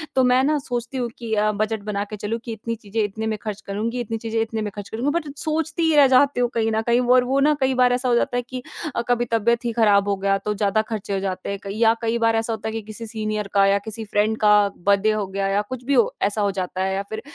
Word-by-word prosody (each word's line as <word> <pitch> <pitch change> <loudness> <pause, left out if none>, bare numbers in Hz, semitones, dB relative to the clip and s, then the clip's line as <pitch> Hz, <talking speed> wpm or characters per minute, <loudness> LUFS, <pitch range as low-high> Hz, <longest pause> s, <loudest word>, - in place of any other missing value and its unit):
तो 260 - +4
मैं 250 +1 +4
ना 300 +2 +2
सोचती 245 -1 -4
हूँ 245 -2 -1
कि 230 -2 -5
अ, 215 0 +2
बजट 215 0 -2
बना 200 -1 -2
के 215 - -5
चलूँ 215 +3 -3
कि 235 - -5
इतनी 230 +1 -4
चीज़ें 220 0 -3
इतने 220 +2 -3
में 220 -1 -1
खर्च 215 -2 -5
करुँगी, 220 +5 -3
इतनी 230 -2 -4
चीज़ें 225 0 -3
इतने 225 0 -2
में 210 -1 -3
खर्च 205 -1 -7
करुँगी 235 +6 -1
बट 335 0 -1
सोचती 320 +2 -1
ही 320 -1 +3
रह 285 -2 +7
जाती 265 +1 +4
हूँ 245 -1 +2
कहीं 225 -1 +1
न 220 0 +1
कहीं 235 +1 +4 0.2
और 255 - +5
वो 265 +2 +1
ना 295 +2 +4
कई 265 0 +2
बार 250 -1 +4
ऐसा 250 +1 -1
हो 240 - +3
जाता 245 +1 +1
है 245 - -1
कि 255 0 -5 0.3
अ, - - +1
कभी 240 0 +1
तबियत 235 +2 +1
ही 235 - 0
खराब 205 -3 +4
हो 200 - +2
गया 195 +1 +1
तो 210 - 0
ज़्यादा 205 +1 +1
खर्चे 215 -2 -5
हो 195 - 0
जाते 190 -1 -4
हैं 200 0 -3
कई 200 0 -5
या 225 0 +5
कई 230 0 0
बार 230 -1 +2
ऐसा 225 0 0
होता 220 0 -5
है - - -6
कि 225 - -3
किसी 215 +2 -9
सीनियर 215 -2 -3
का 200 -1 +5
या 195 0 +4
किसी 220 0 -6
फ्रेंड 210 +1 +1
का 210 -1 +5 0.2
बर्थडे 200 +3 +2
हो 215 -1 -1
गया 195 +1 -2
या 195 +1 +1
कुछ 255 -1 -6
भी 280 0 +2 0.3
ऐसा 205 +1 0
हो 200 -1 +2
जाता 185 -1 -3
है 190 0 0
या 195 - -1
फिर 220 0 -5
220 Hz, 285 wpm, -22 LUFS, 205-245 Hz, 0.3 s, रह